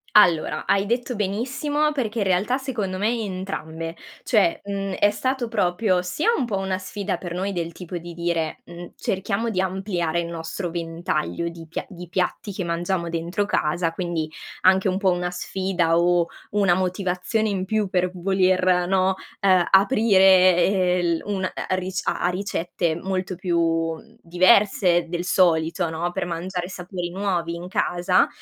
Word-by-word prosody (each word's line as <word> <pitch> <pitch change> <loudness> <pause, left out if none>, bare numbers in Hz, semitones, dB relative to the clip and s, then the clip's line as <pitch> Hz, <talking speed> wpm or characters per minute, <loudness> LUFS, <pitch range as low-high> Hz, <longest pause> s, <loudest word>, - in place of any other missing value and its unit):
Allora, 175 -7 +4
hai 200 0 +2
detto 240 +2 -1
benissimo 265 +9 0
perché 235 -6 -2
in - - +2
realtà 195 +7 +2
secondo 225 -9 -3
me 210 +3 +1
entrambe 165 -5 -5 0.3
cioè, 205 -8 +2
mhmm, 195 -1 -3
è 205 +2 +3
stato 255 +3 -1
proprio 185 -3 +1
sia 185 - -1
un 265 - 0
po' 215 -4 -2
una 190 -1 -2
sfida 195 +1 -3
per 175 -2 -6
noi, 190 +3 -2
del 170 -2 -3
tipo 180 +1 -8
di 170 0 -8
dire: 170 -2 -2
"Mhmm, 175 0 -10
cerchiamo 200 +4 -2
di 185 -3 0
ampliare 185 -3 -1
il 170 - -4
nostro 170 +2 -5
ventaglio 165 -1 -2
di 165 -1 -11
pia 160 - -5
di 180 -3 -10
piatti 185 +3 -1
che 190 - -3
mangiamo 170 +1 -1
dentro 170 +4 -1
casa." 165 -3 0
Quindi 170 -3 -2 0.3
anche 190 +1 +4
un 185 - 0
po' 195 -1 +2
una 180 0 -1
sfida 180 -2 0
o 175 0 +3 0.3
una 200 -3 +3
motivazione 185 +4 -1
in 190 -2 -2
più 215 +1 0
per 180 -1 +1
voler, 185 -1 +2
no, 190 0 +2 0.3
uhm, 185 -3 +4
aprire, 190 -4 +5
ehm, 185 -2 +2
il 170 -2 0
un 200 -2 -2
a 185 - -3
a - - +1
ric 185 0 -3
a - - 0
a 175 - +2
ricette 175 -3 -2
molto 185 +1 -3
più, 175 -1 0
mhmm, 165 -1 -1
diverse 180 -1 +4
del 175 +1 -3
solito, 170 -2 +2
no, 170 +2 -2
per - - -2
mangiare 175 +1 -4
sapori 180 -1 -5
nuovi 180 -3 -1
in 170 +1 -6
casa 180 0 +2
185 Hz, 165 wpm, -23 LUFS, 175-195 Hz, 0.3 s, aprire